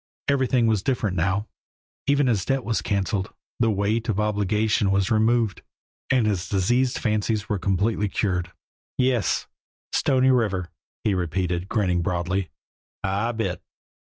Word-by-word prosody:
Everything 130 -3 +2
was 110 -3 +2
different 110 -5 -1
now, 95 +5 0 0.6
even 140 0 +3
his 110 -7 +1
debt 135 +2 0
was 115 -1 -1
canceled, 100 0 -1 0.3
the 115 -2 +3
weight 110 +3 0
of 105 -2 0
obligation 105 0 +1
was 95 -1 +1
removed, 110 0 +2 0.5
and 130 -4 +3
his 95 -4 -1
diseased 120 +7 +1
fancies 110 -1 0
were 105 - -1
completely 100 +3 0
cured. 90 -4 -1 0.5
"Yes! 125 -3 +1 0.5
Stony 130 -1 +3
River," 100 -8 0 0.3
he 105 - +2
repeated, 90 0 -1
grinning 90 -6 +1
broadly. 90 +1 -1 0.5
"I 100 +5 0
bit!" 115 -1 -3
105 Hz, 130 wpm, -24 LUFS, 95-115 Hz, 0.6 s, even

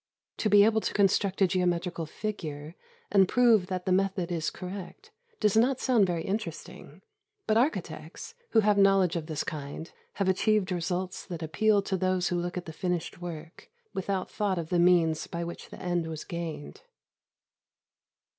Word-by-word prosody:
To 215 - 0
be 205 0 +7
able 220 0 +3
to - - -3
construct 195 -1 +2
a - - +5
geometrical 175 -2 -1
figure, 155 -6 -5 0.4
and 195 -2 +5
prove 230 -6 +4
that 185 -1 -4
the 185 - 0
method 185 -1 +1
is 165 -2 -1
correct, 195 - -8 0.3
does 210 -2 +2
not 250 +4 +3
sound 235 -7 +3
very 170 -2 -2
interesting; 210 +5 -6 0.4
but 215 - +2
architects, 180 - -2 0.2
who 225 - +4
have 205 -1 +3
knowledge 195 -3 +4
of 160 -2 -3
this 155 -3 -2
kind, 150 +1 -6 0.2
have 195 - -1
achieved 195 +1 +2
results 180 +1 -2
that 170 -3 -5
appeal 205 +5 +2
to 190 -1 -1
those 185 -1 +1
who 180 - -1
look 175 +1 -4
at 180 - -4
the 160 - -8
finished 175 0 -3
work, 165 -1 -8 0.2
without 190 0 -2
thought 200 -3 -1
of 165 -2 -4
the 175 - +2
means 170 -3 +3
by 170 0 -4
which 170 0 -7
the - - -11
end 175 -2 -1
was 160 -1 -5
gained. 165 - -6
180 Hz, 170 wpm, -28 LUFS, 170-200 Hz, 0.4 s, be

